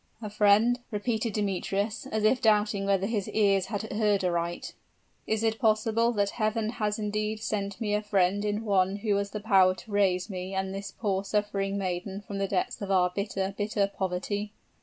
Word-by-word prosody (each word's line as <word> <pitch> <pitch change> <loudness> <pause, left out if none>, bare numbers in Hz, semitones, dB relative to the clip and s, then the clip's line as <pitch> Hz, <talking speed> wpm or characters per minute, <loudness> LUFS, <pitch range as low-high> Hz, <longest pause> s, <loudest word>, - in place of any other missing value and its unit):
"A 215 -3 -6
friend!" 215 +4 +4
repeated 220 0 -1
Demetrius, 200 +1 -2
as 220 -1 -2
if 230 +4 +3
doubting 210 -2 +2
whether 195 -1 +2
his 205 -2 -2
ears 195 -3 +2
heard 205 -1 0
aright; 170 -1 -2 0.5
"is 220 0 0
it 225 0 0
possible 225 0 +2
that 205 -2 +1
Heaven 220 0 -1
has 210 -3 -1
indeed 210 0 -2
sent 200 -2 -3
me 210 -2 -1
a 210 - +1
friend 200 -1 +1
in 210 +1 -2
one 195 -2 +2
who 205 0 0
has 200 0 -2
the 210 - -5
power 190 -4 +4
to 210 - -12
raise 190 -3 +2
me 190 -1 -5
and 190 0 -2
this 195 0 -5
poor 195 -3 -1
suffering 200 -1 -1
maiden 190 +1 -3
from 200 -1 -6
the 195 - 0
depths 190 +2 -2
of 200 - -4
our 180 -2 +3
bitter, 195 0 -2
bitter 205 -1 0
poverty?" 200 +3 -2
205 Hz, 180 wpm, -28 LUFS, 195-215 Hz, 0.5 s, friend